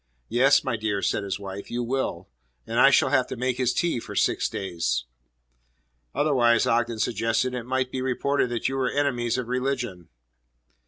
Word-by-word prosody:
"Yes, 130 +5 +4
my 115 - -1
dear," 105 -2 -2
said 105 - 0
his 100 -1 -3
wife, 100 0 -7
"you 120 0 -2
will. 120 -8 -2 0.4
And 115 +1 -1
I 135 - +8
shall 140 0 +4
have 130 -3 +3
to - - -5
make 125 0 -1
his 125 -1 +1
tea 170 -8 0
for - - -9
six - - +1
days." 85 -10 -2 1.1
"Otherwise," 125 -5 +3
Ogden 120 0 +1
suggested, 115 +3 0
"it 125 -1 -5
might 130 0 -1
be 130 - -3
reported 130 +1 0
that 120 -1 -1
you 135 - -2
were 130 -1 +1
enemies 125 -5 0
of 125 -2 -3
religion." 125 -8 -3
120 Hz, 175 wpm, -25 LUFS, 115-130 Hz, 1.1 s, I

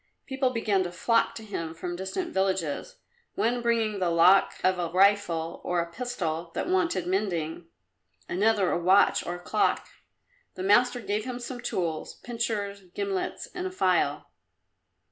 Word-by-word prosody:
People 265 -1 0
began 220 -5 +1
to 175 -1 -3
flock 230 +6 +1
to 225 - -8
him 165 -6 -5
from 175 +1 -5
distant 190 - -4
villages, 190 - -1 0.4
one 240 +2 +1
bringing 225 -3 +1
the 180 -2 +1
lock 170 +3 +5
of 185 -1 +2
a 170 -1 -1
rifle 180 -3 +2
or 175 0 0
a 170 0 -2
pistol 175 -8 -3
that - - -2
wanted 345 - +1
mending; 175 -4 -2 0.6
another 200 +1 +2
a - - +1
watch 190 +3 +4
or 175 - -4
a - - -8
clock. - - +1 0.7
The 185 - -5
master 245 +5 +4
gave 210 0 -2
him 250 -1 -4
some 245 0 -6
tools 165 -7 -3
pincers, 210 -5 -3
gimlets 200 -2 -3
and 365 0 -3
a - - -6
file. 375 - +1
200 Hz, 155 wpm, -27 LUFS, 175-235 Hz, 0.7 s, lock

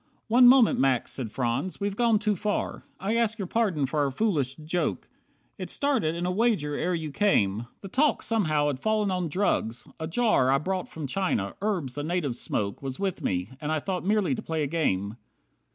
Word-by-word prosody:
"One 245 +2 +7
moment, 250 -2 +6
Max," 130 -2 +2
said 120 -6 -4
Franz. 125 +9 -2
"We've 200 0 -2
gone 230 -1 +3
too 210 0 0
far. 205 +3 -2 0.2
I 205 +4 -1
ask 230 -1 +1
your 200 - -3
pardon 185 -8 +1
for 150 +3 -2
our 140 -1 +2
foolish 140 - 0
joke. 160 +4 -2 0.5
It - - -5
started 255 - 0
in 175 +1 -2
a 180 - 0
wager 200 -8 +1
ere 180 +4 0
you 160 -3 -4
came. 115 - +1
The 195 - -7
talk 280 +9 +2
somehow 155 -10 +1
had 145 -3 -1
fall'n 215 +2 +1
on 180 -3 -1
drugs, 135 - 0
a 160 - -3
jar 195 - +2
I 135 - +4
brought 185 +5 -2
from 160 -2 -6
China, 135 - -1
herbs 185 -11 -1
the 145 - -4
natives 155 -7 -2
smoke, 100 -1 -2
Was 135 -1 -5
with 195 -2 -2
me, 90 +4 -1
and 150 0 -2
I 155 - +1
thought 185 +3 -3
merely 200 -6 +2
to - - -3
play 160 -2 -2
a - - +1
game. 110 - -1
170 Hz, 200 wpm, -27 LUFS, 135-205 Hz, 0.5 s, One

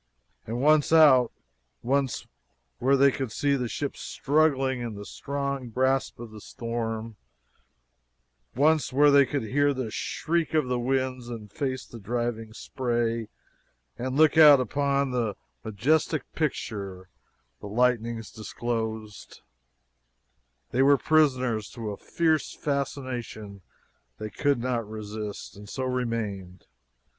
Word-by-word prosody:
And 115 +2 -3
once 150 +2 +4
out 140 -7 +6 0.5
once 135 +1 0 0.5
where 135 +3 +3
they 140 +1 +5
could 130 -4 -4
see 140 +4 +1
the 125 -3 -2
ship 140 +4 -4
struggling 135 -3 +1
in 115 -3 -4
the 100 0 -8
strong 140 -1 -4
grasp 130 +3 0
of 120 -2 -8
the 105 -1 -11
storm 115 -1 -4 1.4
once 150 +3 +3
where 145 +3 +5
they 140 -1 +6
could 140 -4 -2
hear 145 +5 +1
the 125 -4 -3
shriek 165 +5 -1
of 150 -4 +2
the 125 -1 0
winds 130 -1 -1
and 110 -4 -8
face 130 +2 -3
the 115 - -11
driving 115 +1 -3
spray 115 -1 -2 0.7
and 130 +2 -3
look 155 +1 +5
out 150 -3 +9
upon 140 +2 0
the 115 -5 -1 0.3
majestic 135 +7 +1
picture 100 - -3 0.5
the - - -8
lightnings 115 0 0
disclosed, 110 -1 -5 1.3
they 130 - +2
were 140 +1 +6
prisoners 130 -7 +2
to 115 -3 -5
a - - -5
fierce 160 -2 0
fascination 125 -8 -4 0.6
they 110 0 -6
could 145 +3 +1
not 120 -3 -2
resist, 105 -1 -6
and 100 0 -12
so 130 - -4
remained. 115 -8 -3
125 Hz, 125 wpm, -27 LUFS, 110-140 Hz, 1.4 s, out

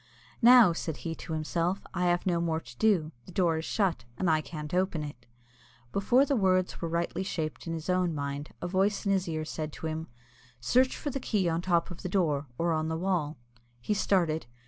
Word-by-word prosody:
"Now," 240 -6 +8
said 160 -2 -4
he 165 - -1
to 160 - -7
himself, 170 +4 -1
"I 180 0 0
have 175 0 +1
no 175 -2 +1
more 165 -1 0
to 120 -5 -14
do; 180 -8 +3 0.2
the - - -10
door 170 -3 +2
is 160 - -5
shut, 190 - 0
and 180 -3 +2
I 155 0 +3
can't 150 0 -7
open 180 -4 +1
it." 125 -5 -9 0.6
Before 240 - +3
the 280 - +1
words 185 -4 +1
were 165 - -2
rightly 170 +2 -1
shaped 160 -4 -4
in 165 - -2
his 160 -1 -6
own 180 -3 +1
mind, 140 0 -4
a - - -1
voice 195 +4 +1
in 200 - +2
his 190 -3 +1
ear 155 -1 -2
said 155 -1 -4
to - - -7
him, 160 +1 -3 0.5
"Search 255 - +2
for 290 - -3
the 275 - -3
key 205 -7 0
on 165 0 0
the 180 - -13
top 170 0 +2
of 175 - -8
the 180 - -4
door, 155 -7 +1
or 170 0 +1
on 155 0 0
the 160 0 -2
wall." 165 -4 -1 0.4
He 120 - -1
started. 170 -8 +1
170 Hz, 220 wpm, -29 LUFS, 155-190 Hz, 0.6 s, Now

